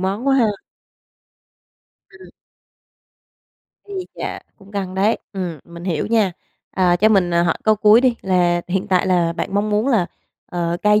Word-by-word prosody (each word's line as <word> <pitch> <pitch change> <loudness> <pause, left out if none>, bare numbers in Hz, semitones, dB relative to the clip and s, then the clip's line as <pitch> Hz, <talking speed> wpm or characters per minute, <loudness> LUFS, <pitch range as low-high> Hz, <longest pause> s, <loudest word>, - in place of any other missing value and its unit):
món 195 +7 -2
quá 275 - +4
ha. 240 - +4 1.6
Ừm. 365 +1 -15 1.6
Ui 380 -3 -5
chà, - - -5 0.2
cũng 195 +1 -17
căng 190 -2 -4
đấy, 200 +4 +2
ừm, 180 -5 -4
mình 170 0 -11
hiểu 170 -5 -1
nha. 215 -5 +2 0.4
À, 180 -2 +2
cho 210 +5 +4
mình, 190 -5 +3
à, 170 - +4
hỏi 170 - +1
câu 215 0 +4
cuối 215 +2 +6
đi 255 -2 +3
là 175 -2 +2
hiện 190 +2 -1
tại 185 -1 +2
là 175 -2 +2
bạn 195 - -4
mong 205 +1 0
muốn 210 +5 +1
là, 215 -10 +2 0.4
ờ, 170 -1 -2
cai 210 0 +4
195 Hz, 170 wpm, -20 LUFS, 175-215 Hz, 1.6 s, cuối